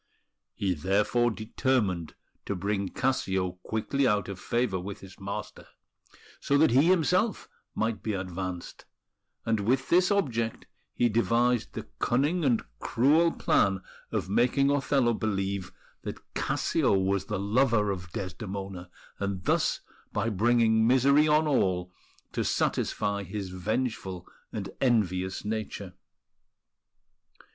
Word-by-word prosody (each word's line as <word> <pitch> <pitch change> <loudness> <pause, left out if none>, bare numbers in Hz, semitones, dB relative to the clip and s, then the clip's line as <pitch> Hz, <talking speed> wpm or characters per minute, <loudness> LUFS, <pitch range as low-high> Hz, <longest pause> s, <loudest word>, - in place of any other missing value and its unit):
He 95 -2 0
therefore 100 +8 +2
determined 110 -6 -1 0.3
to 100 - -1
bring 100 +1 -1
Cassio 95 -8 -1
quickly 130 +7 0
out 105 -4 +1
of 95 -2 -6
favour 120 -5 0
with 100 +3 -7
his 95 -1 -13
master, 100 +2 -6 0.7
so 140 - +2
that 155 -3 +5
he 135 +7 +5
himself 185 +4 +2 0.3
might 110 0 -1
be 110 - -2
advanced; 90 -1 -5 0.6
and 115 -1 +1
with 130 +6 0
this 180 +2 +4
object 120 - 0 0.3
he 120 - +3
devised 115 +1 +1
the - - -5
cunning 145 +8 +1
and 125 -5 +2 0.2
cruel 155 +8 +3
plan 95 - +2 0.3
of - - -1
making 125 +7 +3
Othello 135 -3 +2
believe 100 -3 -2 0.3
that - - -8
Cassio - - +1
was 95 0 0
the 105 - -2
lover 105 +1 +2
of 90 -3 -6
Desdemona, 95 -1 -6 0.3
and 100 -2 -3
thus, - - +1 0.3
by 105 +2 0
bringing 110 +1 +3
misery 140 +4 +5
on 155 +1 +4
all, 90 -10 +1 0.4
to - - -1
satisfy 100 0 0
his 100 -1 -5
vengeful 95 -1 -3 0.2
and - - -5
envious 95 -8 +1
nature. 105 -3 -4
105 Hz, 120 wpm, -28 LUFS, 95-125 Hz, 0.7 s, that